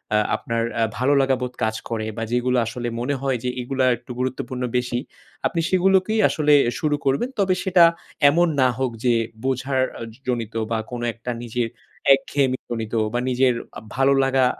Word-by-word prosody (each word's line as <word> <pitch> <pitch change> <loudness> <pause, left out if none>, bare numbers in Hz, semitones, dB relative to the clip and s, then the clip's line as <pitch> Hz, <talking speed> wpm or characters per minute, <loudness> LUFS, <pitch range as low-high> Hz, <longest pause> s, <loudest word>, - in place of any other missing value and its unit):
আ - - +5 0.2
আপনার 115 0 -2 0.2
আ - - +2 0.2
ভালোলাগা 135 0 +3
বোধ 125 0 -3
কাজ 110 0 0
করে 110 -2 -2
বা 115 - -2
যেগুলো 125 +1 +1
আসলে 120 +1 -4
মনে 140 +4 -1
হয় 135 -2 0
যে 125 - 0
এগুলা 130 +1 0
একটু 125 - -12
গুরুত্বপূর্ণ 130 0 -3
বেশি। 120 0 -1 0.5
আপনি 170 - -1
সেগুলোকেই 190 +3 +3
আসলে 150 -1 +2 0.3
শুরু 150 -3 +1
করবেন। 140 - +1
তবে 190 -2 +3
সেটা 185 -3 +5 0.5
এমন 170 +4 +3
না 130 - +5
হোক 130 -1 0
যে, 120 - +4 0.3
বোঝার 130 0 0 0.2
আ - - -8 0.3
জনিত 115 -3 -2 0.2
বা 115 - +1
কোনো 120 -1 -4
একটা 120 +2 -5
নিজের 120 0 -1 0.5
একঘেয়েমি 135 -1 +1
জনিত 115 -2 -4 0.2
বা 120 - +1
নিজের 130 0 +3 0.2
আ - - -8
ভালোলাগা 135 -1 +3
130 Hz, 170 wpm, -22 LUFS, 120-140 Hz, 0.5 s, আ